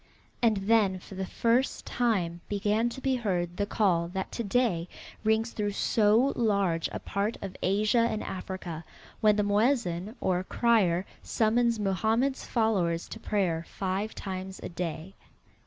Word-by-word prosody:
And 225 -3 +3
then 195 -1 +3
for 185 - -12
the 190 0 -4
first 235 +6 +1
time 185 -8 0
began 210 +3 +1
to 250 - -8
be 265 0 0
heard 180 -8 -1
the 205 - 0
call 180 -6 +2
that 190 +2 -4
to 235 - -3
day 200 -6 +1 0.4
rings 220 +1 +2
through 205 -1 -2
so 220 +6 +3
large 200 -7 +1
a - - -3
part 200 +3 -2
of 195 -2 -7
Asia 210 +5 +2
and 215 - -3
Africa, 180 -3 -6 0.4
when 210 -2 +4
the 210 - +2
muezin, 205 -2 +1
or 180 -1 0
crier, 195 -5 +2 0.2
summons 230 +1 +1
Mohammed's 220 +7 +1
followers 190 -8 +1
to 225 - -7
prayer 185 -7 0
five 195 +3 -3
times 190 -1 -6
a - - -4
day. 170 +1 -5
205 Hz, 150 wpm, -28 LUFS, 185-225 Hz, 0.4 s, when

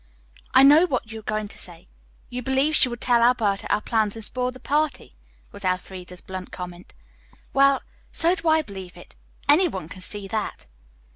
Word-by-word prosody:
"I 260 - +9
know 300 +6 +7
what 250 -6 -2
you 220 - -6
were 215 - -9
going 215 -1 -1
to - - -8
say. 175 -2 -6 0.5
You 250 0 -4
believe 265 +4 +1
she 255 - +5
would 240 0 -7
tell 240 -2 +3
Alberta 225 -5 +2
our - - +2
plans 215 -2 0
and 225 -1 -6
spoil 250 +1 -2
the 255 0 -10
party," 300 - -1 0.4
was 200 - -9
Elfreda's 185 -1 -3
blunt 185 -1 -7
comment. 180 -1 -9 0.6
"Well, 275 0 +4 0.3
so 335 +2 +4
do 340 -2 -3
I 315 0 +4
believe 190 -7 -10
it. - - -15 0.3
Any 315 +6 +6
one 185 - -5
can 185 - -10
see 200 +1 -4
that." 215 +1 -4
225 Hz, 190 wpm, -24 LUFS, 190-275 Hz, 0.6 s, I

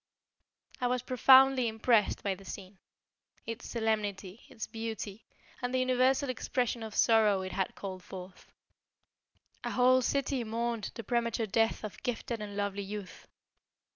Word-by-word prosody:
I 250 - +2
was 250 0 0
profoundly 260 0 +6
impressed 220 0 +2
by 200 - 0
the 195 +1 -12
scene. 190 0 -9 0.7
Its 230 +1 -6
solemnity, 215 -3 -2
its 220 - -6
beauty, 225 -2 -6 0.4
and 245 0 -2
the 260 - +1
universal 255 +2 +2
expression 245 -1 -1
of 220 -1 -7
sorrow 215 -4 +4
it 185 - -5
had 190 -1 -2
called 190 -2 -6
forth. 185 0 -11 1.1
A - - -2
whole 255 +1 +4
city 275 0 0
mourned 230 -1 -2
the 230 - -6
premature 235 0 0
death 225 +3 +1
of 215 - -7
gifted 235 -1 -3
and 205 -1 -6
lovely 200 0 -1
youth. 200 -1 -8
225 Hz, 140 wpm, -31 LUFS, 205-245 Hz, 1.1 s, profoundly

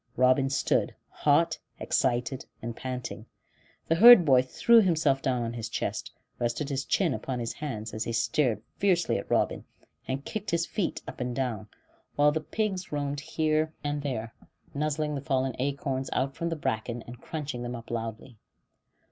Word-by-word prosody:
Robin 130 +2 +4
stood, 140 - +1
hot, 160 +3 +2 0.2
excited, 125 0 0
and 115 0 -5
panting; 125 0 -5 0.6
the - - +3
herd 215 +1 +9
boy 130 -4 +6
threw 230 - +5
himself 160 -8 +2
down 125 -2 0
on 115 0 -3
his 115 -2 -5
chest, - - -3 0.3
rested 120 +5 -1
his 135 -1 -2
chin 165 +4 +2
upon 130 -1 -3
his 115 -1 -3
hands, 115 -8 -5
as 110 - -3
he - - -2
stared 115 -1 +1
fiercely 185 -4 +2
at - - -9
Robin, - - +1 0.4
and 135 +2 -3
kicked 215 -2 -4
his 170 -1 +1
feet 195 -2 -2
up - - -8
and 125 -1 -2
down; 120 -5 -2 0.5
while 145 0 +5
the 160 +1 -1
pigs 195 +1 -2
roamed 145 -1 -2
here 155 +2 0
and 145 0 -1
there, 115 -5 -4 0.4
nuzzling 150 +1 -1
the 140 - -3
fallen 130 -1 0
acorns 135 -1 -2
out 135 +1 -1
from 170 - -2
the 165 - -2
bracken, 115 -4 -3
and 120 +1 -11
crunching 150 -6 -5
them 120 0 -4
up 115 0 -9
loudly. 115 0 -5
135 Hz, 170 wpm, -28 LUFS, 120-155 Hz, 0.6 s, herd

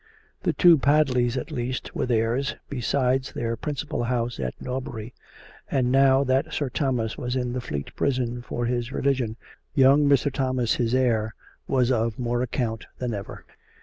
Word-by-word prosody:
The - - +1
two 170 -4 +6
Padleys, 130 -3 +3
at - - -4
least, 125 +1 -3
were - - -1
theirs, 120 +3 +1 0.2
besides 130 0 0
their 115 0 -2
principal 145 -1 -3
house 120 -1 -1
at 65 -2 -4
Norbury; 125 -3 -5 0.6
and 125 -2 +1
now 135 0 +5
that 130 0 +1
Sir 145 -3 -1
Thomas 125 -6 -1
was 125 +1 -2
in 125 -1 -1
the 125 - -2
Fleet 70 -12 -5
Prison 125 -3 -1
for 120 0 -3
his 120 +1 -1
religion, 130 -6 0 0.4
young 140 +1 +5
Mr. 140 0 +3
Thomas, 130 -4 +1
his 120 0 0
heir, 110 -5 +1 0.3
was 130 -1 +2
of 115 -2 0
more 120 -1 -1
account 120 -2 -2
than 125 -2 -2
ever. 100 -1 -7
125 Hz, 160 wpm, -25 LUFS, 120-135 Hz, 0.6 s, two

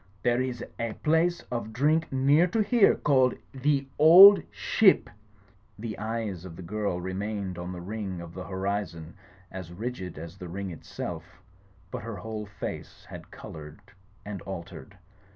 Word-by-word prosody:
There 120 +1 +2
is 125 -2 -3 0.2
a 115 -1 -2
place 165 +5 +1
of 115 -2 -4
drink 155 +7 +1
near 140 +6 +4
to 215 +4 +1
here 220 0 +4
cafled 130 -3 +2
'The 135 +1 0
Old 185 +6 +10
Ship'—" 205 -4 +3 0.7
The 110 0 -6
eyes 110 -5 -3
of 90 -3 -9
the 90 - -9
girl 100 -1 -2
remained 95 0 -4
on 90 +1 -5
the 90 -1 -7
ring 100 -1 -5
of 85 -1 -9
the 90 -1 -7
horizon 95 -4 -3 0.4
as 95 -2 -8
rigid 95 -3 -5
as 85 +4 -9
the 90 - -7
ring 95 +1 -5
itself; 80 - -8 0.5
but - - -5
her 115 0 -6
whole 105 +2 -6
face 100 - -7
had - - -10
coloured 75 0 -10 0.5
and 100 -3 -6
altered. 95 +2 -9
105 Hz, 150 wpm, -27 LUFS, 90-130 Hz, 0.7 s, Old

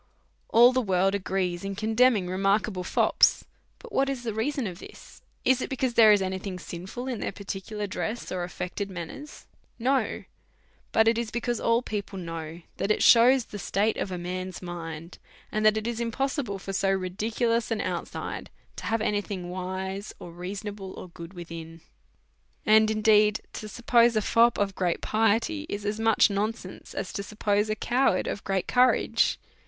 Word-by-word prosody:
All 240 +2 +7
the 255 - +2
world 190 -2 +2
agree 185 -3 -1
in 195 0 -4
condemning 220 -1 +3
remarkable 195 +1 0
fops. - - +3 0.4
Now, 485 - -10
what 275 0 +2
is 265 -3 -3
the 225 -2 -3
reason 265 +4 -1
of 180 -3 -6
it? - - -11 0.5
Is 260 0 +4
it - - -3
because 260 -2 -1
there 220 -2 +7
is 205 -2 +4
any 190 0 -2
thing 190 -1 -5
sinful 185 +8 -7
in 245 -4 -3
their - - -2
particular 200 +2 -5
dress 215 +4 -4
or 180 -1 -2
affected 180 +3 -4
manners 185 - -8 0.2
'{ - - -40 0.2
No; 270 - -1 0.7
but 220 0 +4
it 230 0 +3
is 235 -2 -3
because 240 0 -2
all 230 +1 +2
people 205 -3 -4
know 165 -1 -6
that - - -2
it 215 - +2
shews 245 +1 +6
the 205 - -8
state 205 +4 0
of 190 - -3
a 180 - -3
man's 185 +1 -5
mind, 170 -1 -7 0.3
and 215 - -1
that 215 0 +4
it 220 - -3
is 235 -1 -2
im 235 -1 -1
possible 270 -5 -2
for 195 0 -6
so 195 0 +1
ridiculous 220 +5 0
an 225 -2 -1
outside - - -4 0.3
to - - -7
have 225 0 0
any 210 -1 +1
thing 185 -4 -6
wise, 190 +2 -5
or 175 - -10
reasonable, 195 +2 -6
or 185 - -9
good 170 +1 -11
within. 165 -1 -8 0.9
And, 215 0 +6
indeed, 215 -1 +4
to*", 215 - -6
suppose 235 +1 +3
a 215 - +2
fop 235 +2 +4
of 200 -1 0
great 180 -2 -1
piety 225 +8 +1
is 205 0 -4
as 210 +1 -2
much 225 -1 +4
nonsense 215 +3 -4
j - - -13
as - - -4
to 200 - -3
suppose 210 +1 0
a 215 - 0
coward 240 -2 +1
of 200 - -4
great 195 -1 -1
courage. 250 0 +3
205 Hz, 185 wpm, -27 LUFS, 185-230 Hz, 0.9 s, All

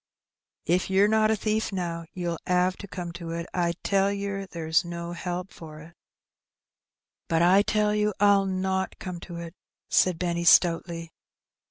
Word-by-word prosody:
If 180 +4 +1
yer 195 +2 +4
not 215 0 +3
a 220 - +3
thief 215 +1 -1
now, 170 -3 -3
ye'll 175 -2 -3
'ave 180 +1 +2
to 200 - -9
come 180 -2 -6
to 170 -1 -8
it. 170 0 -4
I 170 -2 +1
tell 195 0 +2
yer 200 -1 -4
there's 165 0 0
no 170 0 -6
help 180 +1 -5
for 155 -2 -11
it." 160 +3 -13 0.7
" - - -66
But 165 0 +2
I 185 +3 +6
tell 210 0 +1
you 210 0 +1
I'll 200 -1 +4
not 190 0 -2
come 180 -2 -6
to 175 0 -9
it," 170 -1 -7 0.4
said 180 -3 +3
Benny, 170 -1 -1
stoutly. 165 -1 +3
180 Hz, 170 wpm, -26 LUFS, 170-195 Hz, 0.7 s, I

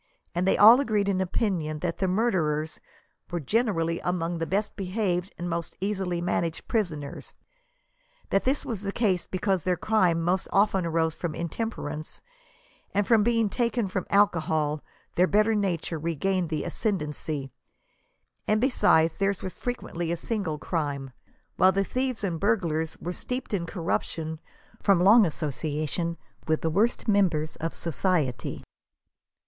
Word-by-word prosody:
and 175 +2 0
they - - +3
all 225 +5 +9
agreed 215 -7 +1
in 190 -1 +1
opinion 175 -5 -1
that 170 +2 -3
the 190 - +1
murderers* 170 -7 0 0.5
were 175 - -2
generally 170 - 0
among 175 -1 -2
the 165 - -2
best 205 +4 -1
behaved 185 -2 -1
and 175 - -4
most 170 -1 -3
easily 190 -3 -1
managed 170 -1 -2
prisoners; 160 - -3 1.0
that 195 - +3
this 270 +2 +1
was 220 -5 -3
the 200 -1 -2
case 200 -6 0
because 190 -1 0
their 180 +2 0
crime 185 -6 +2
most 180 +3 0
often 195 -3 +3
arose 160 -1 +1
from 170 -1 -4
intemper 170 -1 -3
ance, 155 +1 -7 0.8
and 210 +2 +4
being 230 -1 +2
taken 235 0 0
from 185 -1 -3
alcohol 160 -6 +2 0.3
their 180 +1 +3
better 215 +3 +3
nature 180 -6 -1
regained 170 +3 -1
the 155 -2 -2
ascendancy; 150 - -3 1.0
and 215 0 +3
besides, 165 - +3
theirs 195 -1 0
was 185 - -5
frequently 175 -9 -4
a 170 - -1
single, 190 -7 -2
crime, 145 -4 -3 0.5
while 185 - +6
the 195 +1 +1
thieves 255 +1 -2
and 175 -5 -1
burglars 165 -7 0
were 175 - -4
steeped 250 +4 -4
in 175 -4 -1
corrup 170 -2 0
tion 160 -1 -5 0.4
from 195 -4 +4
long 210 +1 +7
association 155 +2 -2 0.3
with 155 0 +1
the 160 - 0
worst 215 +10 +1
members 180 -7 +2
of 165 +1 -4
society. 165 -6 -1
180 Hz, 145 wpm, -27 LUFS, 160-205 Hz, 1.0 s, all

